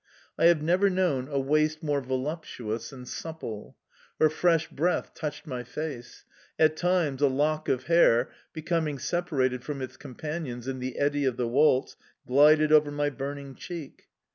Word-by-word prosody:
I - - +2
have 170 -3 +5
never 180 +5 +3
known 175 -9 0
a 140 -1 -1
waist 155 +3 +1
more 145 -2 0
voluptuous 130 -4 -4
and 125 -2 -10
supple! 140 -11 -7 0.4
Her 155 -1 +5
fresh 165 0 +2
breath 175 +5 -1
touched 150 -1 -5
my 125 -5 -5
face; 125 -1 -7 0.3
at 155 0 +4
times 170 -6 0
a 145 - +6
lock 150 +3 0
of 130 -1 0
hair, 130 -8 +4 0.2
becoming 160 -2 -1
separated 130 -7 -1
from 140 +2 -5
its 130 -1 -6
companions 140 -3 -6
in 130 -1 -3
the 130 0 -5
eddy 145 0 +1
of 130 -2 0
the 125 - 0
waltz, 135 +1 +2 0.3
glided 150 +3 +5
over 150 -1 +6
my 145 0 -1
burning 140 0 -6
cheek... 165 +1 -9
145 Hz, 160 wpm, -27 LUFS, 130-155 Hz, 0.4 s, a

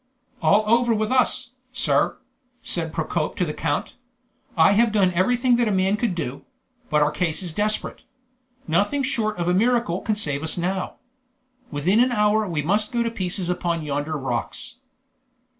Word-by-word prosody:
"All 200 +6 +4
over 235 +1 +3
with 215 +1 -1
us, 255 -1 +2 0.2
sir!" 260 - +1 0.5
said 165 -2 0
Procope 160 -1 -2
to 180 - 0
the 150 - -4
count. 145 -2 -2 0.6
"I 160 +4 +6
have 225 +3 +3
done 195 -4 +3
everything 240 +7 +2
that 235 -3 +1
man 190 +1 +2
could 215 -4 -1
do; 140 -5 -4 0.5
but 150 -1 +3
our 150 - +1
case 165 +1 -1
is 170 -3 -4
desperate. 210 +4 -2 0.7
Nothing 205 - +1
short 220 -6 -1
of 175 -1 -2
a 180 - +3
miracle 225 -3 +1
can 215 - -1
save 145 -9 -1
us 160 +2 0
now. 185 +2 -2 0.7
Within 170 +9 +1
an 250 +1 +4
hour 210 -1 +2
we 160 -5 -2
must 205 +6 +1
go 235 -1 +1
to 230 - -2
pieces 185 -3 -2
upon 175 -2 -1
yonder 145 +2 -2
rocks." 130 - -4
190 Hz, 165 wpm, -23 LUFS, 160-220 Hz, 0.7 s, I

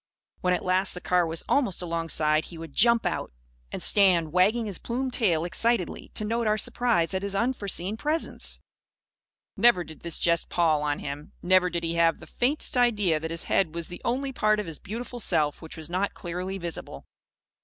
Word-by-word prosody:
When 180 0 +2
at - - -5
last 185 +1 +2
the - - -5
car 180 -1 +1
was 165 0 -1
almost 250 -10 +1
alongside, 165 -2 0
he 170 - -10
would 160 -3 -9
jump 235 +1 +4
out; - - -2 0.4
and - - -3
stand 175 -6 +5
wagging 210 +6 +3
his 200 -4 -3
plumed 255 +2 -3
tail 170 -10 +1
excitedly, 225 +1 -1
to 215 - 0
note 230 +1 -1
our 215 0 +2
surprise 220 -7 +1
at 190 - -1
his 200 0 0
unforeseen 205 -4 -2
presence. 305 +6 -1 1.0
Never 215 -4 +4
did 160 -2 -12
this 170 -2 -3
jest 170 -1 +1
pall 160 -3 +2
on 145 -1 -1
him. 145 +1 -7
Never 185 0 +4
did 170 -1 -3
he 165 0 -1
have 165 -1 +3
the - - -11
faintest 280 +4 -1
idea 210 -10 +2
that 160 +1 -5
his 165 0 -3
head 165 -4 0
was 170 -1 -4
the 175 - -9
only 270 +3 -1
part 215 -2 +2
of 210 - -3
his 165 -3 -7
beautiful 240 +4 -6
self 150 -8 +1
which 160 -1 -10
was 160 -1 -6
not 185 +4 -2
clearly 180 +2 -5
visible. 170 -3 -6
180 Hz, 195 wpm, -26 LUFS, 165-220 Hz, 1.0 s, stand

